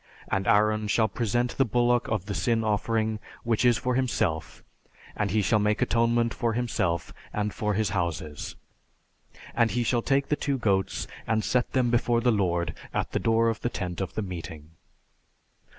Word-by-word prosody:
And 95 0 0
Aaron 105 -1 +3
shall 110 +2 +3
present 120 +3 -1
the - - +7
bullock 120 +2 +2
of 110 -6 -1
the 105 - -4
sin 115 +5 +1
offering, 110 0 0 0.2
which 115 0 +1
is 120 -2 +5
for 125 0 -1
himself, 95 - -1 0.5
and 105 -2 0
he 105 +2 +1
shall 105 +3 +3
make 105 +1 +1
atonement 115 -1 +2
for 115 -2 -1
himself 95 -8 -1 0.2
and 105 0 -2
for 105 -3 -1
his 110 -1 +1
houses. 80 -6 -3 1.0
And 115 -1 +3
he 120 +1 0
shall 120 0 +1
take 140 +2 +1
the 150 - +3
two 140 -2 -1
goats 100 -5 0 0.2
and 110 -1 +1
set 125 +2 0
them 125 -2 +2
before 120 0 +2
the 120 +1 +3
Lord 85 -5 0 0.2
at - - -2
the - - 0
door 115 0 +3
of 115 -1 -1
the 120 - 0
tent 90 -5 -4
of 95 - -4
the 110 - -1
meeting." 80 -4 -7
110 Hz, 180 wpm, -27 LUFS, 95-120 Hz, 1.0 s, the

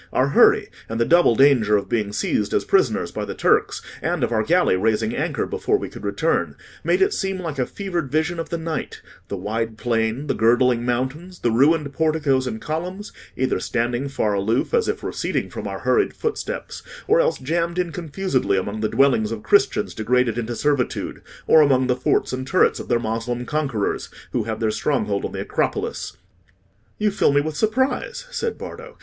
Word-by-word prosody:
Our 130 +2 +2
hurry, - - +5 0.2
and 115 +1 -3
the 115 - +3
double 170 -7 +5
danger 120 -6 +5
of 100 - -4
being 110 -4 -1
seized - - -1
as - - +1
prisoners - - +2
by - - -4
the - - -5
Turks, - - +1 0.2
and - - -1
of - - 0
our 110 -2 +2
galley 170 - +3
raising 110 +3 0
anchor 155 +2 -1
before 425 -1 0
we - - -6
could - - -11
return, - - 0 0.3
made 380 - +3
it 405 +2 +1
seem 195 -1 -2
like 165 -6 -5
a 125 - +1
fevered 175 -9 -4
vision 160 +3 0
of 165 - -4
the 170 - -2
night—the 160 -3 -6
wide 110 +1 -3
plain, 115 +3 -1
the - - 0
girdling 120 +1 +3
mountains, 130 +9 -3
the 120 - +1
ruined 145 +4 +3
porticos 150 -4 +1
and 110 - -4
columns, 180 - -5 0.3
either 130 0 0
standing 120 +3 -1
far 110 -6 0
aloof, 110 - 0
as 470 -2 +2
if - - -2
receding - - -2
from - - -5
our - - -5
hurried 420 - +1
footsteps, 470 +2 -4 0.3
or 450 +4 +4
else - - +1
jammed 170 +4 -1
in 180 -2 0
confusedly 160 - -1
among 100 +3 -3
the 110 - 0
dwellings 125 -6 +3
of 110 -2 -5
Christians - - +2
degraded 120 +1 +1
into 120 0 -3
servitude, 140 -1 -1 0.2
or 160 - +6
among 130 -3 +4
the 125 -1 +1
forts 125 - 0
and 130 0 -4
turrets 185 - +3
of - - -7
their 120 - +2
Moslem 115 +2 -3
conquerors, 135 -9 -2 0.2
who 120 -4 -1
have 110 -1 -3
their 110 -1 +1
stronghold 105 -5 -1
on - - -4
the - - -3
Acropolis." - - -2 0.8
"You 210 0 +1
fill 195 - +2
me 140 - +4
with 155 +1 -4
surprise," 260 - 0
said 460 -2 -2
Bardo. 475 +1 -9
135 Hz, 190 wpm, -22 LUFS, 115-170 Hz, 0.8 s, or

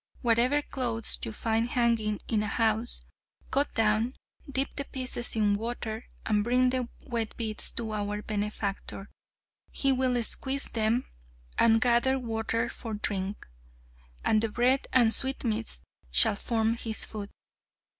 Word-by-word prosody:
Whatever 245 +5 +3
clothes 235 -5 0
you - - -3
find 225 +2 0
hanging 230 -4 +1
in 215 -2 +1
a 210 - -1
house, 225 +2 +1 0.5
cut 280 +2 +2
down, 225 +3 +2 0.4
dip 270 +1 -1
the 280 - -3
pieces 255 -3 -2
in 210 -2 +3
water, 225 +1 -4 0.2
and 210 -1 +2
bring 250 +2 +3
the 250 -2 -1 0.2
wet 230 -4 -3
bits 220 -2 +1
to 225 -2 -2
our 210 0 -3
benefactor. 205 -1 -3 0.6
He 275 - +2
will 255 -2 +1
squeeze 270 +4 +1
them 225 +2 +1 0.5
and 225 -1 +6
gather 245 +3 +3
water 230 -2 -1
for 225 -2 -6
drink! 200 -1 -2 0.8
and 215 -1 +4
the 225 - 0
bread 250 +4 +2
and 235 -3 +5
sweetmeats 235 -4 0 0.3
shall 220 -3 +5
form 225 +2 0
his 225 -1 -2
food." 205 -2 -6
230 Hz, 135 wpm, -28 LUFS, 215-250 Hz, 0.8 s, and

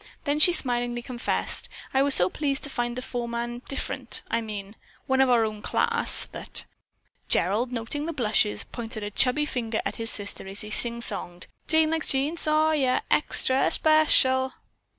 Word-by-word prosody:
Then 290 0 0
she 355 - +8
smilingly 245 -6 -1
confessed: 245 -1 -2 0.2
"I 265 - +3
was 280 0 +5
so 180 - +6
pleased 280 +5 -2
to 285 - -5
find 240 -1 -2
the 255 - -5
foreman 240 -1 -4
different 275 - -3
I 230 - +1
mean 205 -2 -7 0.3
one 265 -1 +2
of 265 - +4
our 235 -2 +4
own 215 -1 -5
class - - +1
that - - -2 0.3
" - - -42
Gerald, 215 +8 +1
noting 250 +6 -4
the - - -2
blushes, 220 -7 0
pointed 225 -2 -7
a 205 - -5
chubby 265 +7 +1
finger 230 -5 -3
at - - -3
his 225 -1 -2
sister 205 -2 -3
as 195 +1 -2
he 210 0 -7
sing 235 0 +2
songed: 175 -5 -5 0.2
"Jane 315 -1 +3
likes 320 -1 0
Jean 280 +4 +1
Sawyer 310 -5 +2
extra 265 -3 +3
special." 265 -4 +3
245 Hz, 170 wpm, -26 LUFS, 225-285 Hz, 0.3 s, she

